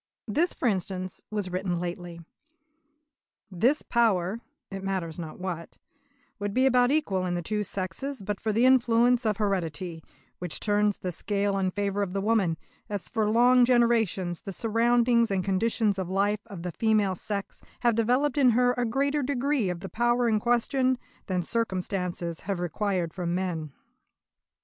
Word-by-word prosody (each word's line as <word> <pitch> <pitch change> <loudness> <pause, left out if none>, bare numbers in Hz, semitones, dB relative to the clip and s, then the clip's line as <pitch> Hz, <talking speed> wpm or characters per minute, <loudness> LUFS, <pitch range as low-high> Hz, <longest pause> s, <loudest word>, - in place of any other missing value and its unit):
This, 315 - +1
for - - -1
instance, 185 -2 -2
was 205 -4 -3
written 180 -1 -1
lately: 175 -1 -5 1.3
"This 240 - +2
power 215 -4 +1 0.3
[it 195 0 -6
matters 180 -4 -3
not 160 -2 -7
what] 180 -3 -5 0.6
would 205 0 -3
be 260 +1 +4
about 250 -1 +4
equal 265 -11 +1
in 180 -1 -1
the 175 - -3
two 210 +4 -1
sexes 200 +7 -4
but 205 0 -3
for 220 - 0
the 230 +4 +3
influence 245 -1 +4
of 210 -2 +1
heredity, 175 -5 -2 0.4
which 175 -3 -4
turns 205 -1 +1
the 180 - -4
scale 200 +3 -1
in 190 -1 +1
favour 200 +1 -1
of 190 -3 -2
the 195 - -1
woman, 200 -6 +1 0.3
as 205 -3 -3
for 220 -3 0
long 245 +3 +5
generations 230 -8 +2
the 195 - -6
surroundings 235 +2 +2
and 195 -2 0
conditions 200 +1 +1
of 185 -2 -3
life 205 +2 +1
of 195 -6 -8
the 180 - -3
female 215 0 +2
sex 200 +2 -5 0.2
have 240 -1 +3
developed 250 +6 +1
in 260 -3 +6
her 250 0 +4
a 245 -1 -1
greater 280 +5 +1
degree 275 -4 0
of 175 -1 -4
the 195 - -5
power 240 +5 +1
in 215 -2 +2
question 255 +3 +1 0.3
than 185 -3 -1
circumstances 180 -5 -2
have 195 -2 -3
required 175 -1 -1
from 175 -2 -2
men." 170 -5 -3
205 Hz, 165 wpm, -27 LUFS, 185-235 Hz, 1.3 s, in